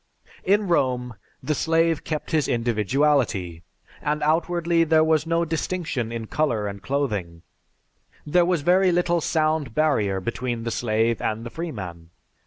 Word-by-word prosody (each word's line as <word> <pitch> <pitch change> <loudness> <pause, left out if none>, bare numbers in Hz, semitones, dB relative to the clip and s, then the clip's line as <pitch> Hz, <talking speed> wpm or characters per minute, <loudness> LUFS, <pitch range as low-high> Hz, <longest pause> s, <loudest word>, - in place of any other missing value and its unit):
_) - - -29
In 205 +2 +2
Rome, 125 -7 0 0.3
the 155 +4 0
slave 165 +1 +1
kept 155 -2 -4
his 155 -5 +2
individuality, 115 - 0 0.4
and 150 +1 -1
outwardly 170 +2 +2
there 160 -1 +4
was 160 0 +2
no 165 0 +1
distinction 160 -7 -2
in 115 -1 -4
color 115 -5 0
and 100 -1 -5
clothing; 105 -12 -2 0.8
there 175 +4 +3
was 175 -3 +1
very 185 +3 +4
little 175 -1 +1
sound 155 -6 0
barrier 110 -11 +1
between 120 +3 -3
the 115 - -3
slave 115 0 0
and 110 +2 -2
the 120 - -7
freeman. 95 - -6
145 Hz, 145 wpm, -24 LUFS, 115-165 Hz, 0.8 s, there